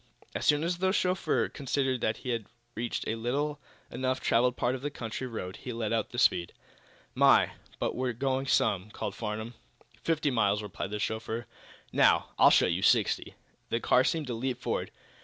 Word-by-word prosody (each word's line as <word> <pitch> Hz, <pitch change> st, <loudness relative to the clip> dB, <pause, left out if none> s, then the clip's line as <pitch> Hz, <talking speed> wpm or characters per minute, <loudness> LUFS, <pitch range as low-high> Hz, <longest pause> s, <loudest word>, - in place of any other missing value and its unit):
As -, -, -2 dB
soon 150 Hz, +1 st, +4 dB
as 170 Hz, +1 st, -1 dB
the 190 Hz, 0 st, +2 dB
chauffeur 185 Hz, -2 st, +1 dB
considered 135 Hz, -3 st, -1 dB
that 110 Hz, 0 st, 0 dB
he -, -, -2 dB
had 115 Hz, -3 st, -2 dB, 0.3 s
reached 120 Hz, +1 st, -3 dB
a -, -, 0 dB
little 140 Hz, +6 st, -1 dB, 0.3 s
enough 130 Hz, +1 st, -1 dB
traveled 125 Hz, +2 st, +2 dB
part 120 Hz, +1 st, +1 dB
of 130 Hz, -, -4 dB
the 145 Hz, -, -2 dB
country 125 Hz, -1 st, -5 dB
road 100 Hz, -5 st, -6 dB
he 125 Hz, -, -6 dB
let 115 Hz, -1 st, -2 dB
out 110 Hz, -2 st, 0 dB
the 120 Hz, -, -8 dB
speed. 90 Hz, -7 st, +2 dB, 0.6 s
"My, -, -, +5 dB, 0.3 s
but -, -, -2 dB
we're 125 Hz, -1 st, -1 dB
going 135 Hz, +2 st, -1 dB
some," 100 Hz, -5 st, +2 dB
called 105 Hz, -, -4 dB
Farnum. 110 Hz, +2 st, -4 dB, 0.5 s
"Fifty 155 Hz, -3 st, +1 dB
miles," 105 Hz, -3 st, +2 dB
replied 100 Hz, -1 st, -5 dB
the 105 Hz, -, -3 dB
chauffeur. 110 Hz, +2 st, -3 dB, 0.5 s
"Now, -, -, +4 dB
I'll -, -, +8 dB
show -, -, +5 dB
you 90 Hz, +1 st, 0 dB
sixty." 95 Hz, -, +2 dB, 0.3 s
The 115 Hz, -, 0 dB
car 125 Hz, +2 st, +4 dB
seemed 160 Hz, +2 st, 0 dB
to 125 Hz, -, -4 dB
leap 125 Hz, +2 st, -2 dB
forward. -, -, -2 dB
120 Hz, 185 wpm, -29 LUFS, 110-135 Hz, 0.6 s, I'll